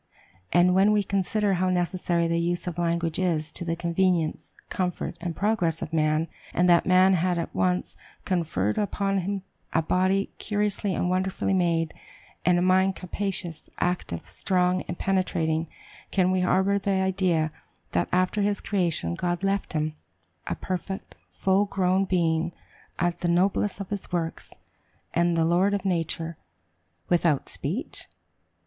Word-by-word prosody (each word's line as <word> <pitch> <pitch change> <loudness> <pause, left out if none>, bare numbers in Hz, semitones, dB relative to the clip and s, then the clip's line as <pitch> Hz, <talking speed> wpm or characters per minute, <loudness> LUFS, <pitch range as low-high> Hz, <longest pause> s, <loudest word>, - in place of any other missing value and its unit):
And 175 +1 +5
when 195 +3 +5
we 210 -1 +3
consider 200 +1 +1
how 185 0 +1
necessary 175 -1 0
the 170 0 +1
use 175 +1 -1
of 175 -1 -4
language 170 -1 0
is 165 -4 0
to - - -6
the 165 -1 -1
convenience, 170 -1 0 0.2
comfort, 180 -2 -2
and 170 -2 -3
progress 180 -5 0
of 160 - -7
man, 155 0 +2 0.3
and 180 +1 +3
that 175 -1 +5
man 185 +1 +6
had 180 0 +1
at 170 - -3
once 180 0 0 0.3
conferred 155 - 0
upon 195 -1 0
him 195 +1 -3 0.3
a 165 - +2
body 185 +4 +1
"curiously 205 -2 -1
and - - 0
wonderfully 190 +1 0
made," 170 -3 +1 0.5
and 180 -1 +4
a 175 - +2
mind 190 +1 +3
capacious, 180 -3 -4
active, 175 - -2
strong, 180 -1 +1
and 175 - -4
penetrating, 165 -4 0 0.4
can 185 -1 +2
we 185 - +2
harbor 190 +2 +2
the 200 - -2
idea 185 -4 +1 0.4
that 85 - 0
after 185 +3 +2
his 205 0 +1
creation, 170 - -1
God 175 - -2
left 195 -1 0
him, 155 0 -1 0.5
a - - -1
perfect, 185 +1 -5 0.2
full 195 +2 +2
grown 190 -1 +1
being, 170 -2 +1 0.7
the 175 - -1
noblest 190 +4 +1
of 200 - -6
his 200 -2 -5
works, 165 -2 -3 0.6
and 170 0 +2
the 165 - +3
lord 185 +5 +3
of 200 -1 -4
nature, 165 -2 -1 0.7
without 170 -5 +2
speech? - - -4
180 Hz, 150 wpm, -26 LUFS, 170-190 Hz, 0.7 s, man